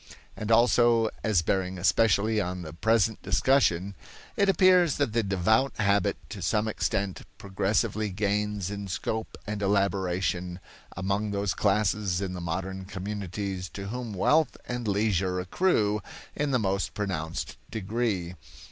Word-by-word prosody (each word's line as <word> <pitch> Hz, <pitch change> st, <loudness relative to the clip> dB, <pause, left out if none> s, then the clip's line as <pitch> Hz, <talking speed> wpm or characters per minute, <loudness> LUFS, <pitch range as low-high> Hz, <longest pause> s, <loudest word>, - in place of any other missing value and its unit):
And 110 Hz, +1 st, -4 dB
also 115 Hz, -1 st, +4 dB
as 105 Hz, -6 st, +2 dB
bearing 95 Hz, +1 st, -1 dB
especially 105 Hz, +3 st, +3 dB
on 90 Hz, -1 st, -4 dB
the 80 Hz, -1 st, -8 dB
present 110 Hz, +4 st, +1 dB
discussion 100 Hz, -3 st, +2 dB, 0.4 s
it 200 Hz, -1 st, +3 dB
appears 185 Hz, -5 st, +5 dB
that 140 Hz, -7 st, 0 dB
the 115 Hz, -, +3 dB
devout 110 Hz, +7 st, +1 dB
habit 100 Hz, 0 st, +2 dB
to 100 Hz, -1 st, -7 dB
some 105 Hz, +5 st, +1 dB
extent 100 Hz, -3 st, -1 dB, 0.2 s
progressively 105 Hz, +2 st, 0 dB
gains 105 Hz, 0 st, -1 dB
in 100 Hz, -1 st, -5 dB
scope 110 Hz, +4 st, -3 dB
and 105 Hz, -1 st, -4 dB
elaboration 95 Hz, -3 st, 0 dB, 0.4 s
among 100 Hz, +3 st, -1 dB
those 100 Hz, -2 st, -1 dB
classes 100 Hz, -2 st, +1 dB
in 95 Hz, -2 st, -3 dB
the 90 Hz, -, -5 dB
modern 95 Hz, +3 st, -4 dB
communities 95 Hz, -1 st, -4 dB
to 100 Hz, 0 st, -5 dB
whom 120 Hz, -1 st, -5 dB
wealth 155 Hz, -, +2 dB
and 120 Hz, -2 st, -3 dB
leisure 95 Hz, -3 st, +1 dB
accrue 105 Hz, -, +1 dB, 0.3 s
in 150 Hz, 0 st, -1 dB
the 130 Hz, -, +2 dB
most 100 Hz, -3 st, -1 dB
pronounced 85 Hz, -6 st, -3 dB
degree. 105 Hz, -4 st, -2 dB
100 Hz, 135 wpm, -27 LUFS, 95-110 Hz, 0.4 s, appears